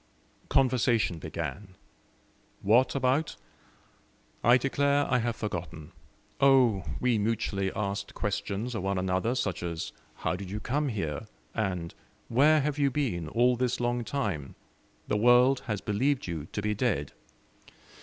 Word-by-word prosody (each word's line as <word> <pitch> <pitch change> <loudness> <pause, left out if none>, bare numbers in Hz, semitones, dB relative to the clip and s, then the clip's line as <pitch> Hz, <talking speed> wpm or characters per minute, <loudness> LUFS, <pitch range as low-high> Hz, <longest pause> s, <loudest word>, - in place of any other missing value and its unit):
Conversation 120 -9 +2
began. 95 +3 -6 0.9
What 115 +8 +4
about? 135 +4 +1 1.1
I 120 +1 +7
declare 140 +2 +1
I 125 - +2
have 120 0 -1
forgotten. 85 -7 -5 0.5
Oh! 130 -8 +5 0.2
we 125 -3 +2
mutually 100 -3 -1
asked 100 -1 -3
questions 105 +3 -2
of 110 - -3
one 95 +1 -1
another, 95 +6 0
such 95 -7 -2
as 85 -2 -4 0.2
"How 80 - -2
did 95 0 -7
you 105 +2 -4
come 145 +6 -1
here?" 100 - -3 0.3
and 90 -6 -2 0.4
"Where 150 +6 +5
have 150 +1 -2
you 140 -1 +3
been 120 - -2
all 125 +6 +3
this 125 0 -1
long 120 0 0
time? 100 - -3 0.5
the - - +1
world 125 +4 +5
has 105 -3 -2
believed 125 +6 0
you 80 -3 -5
to 105 - -3
be 105 0 +1
dead." 105 - -1
110 Hz, 135 wpm, -28 LUFS, 95-125 Hz, 1.1 s, I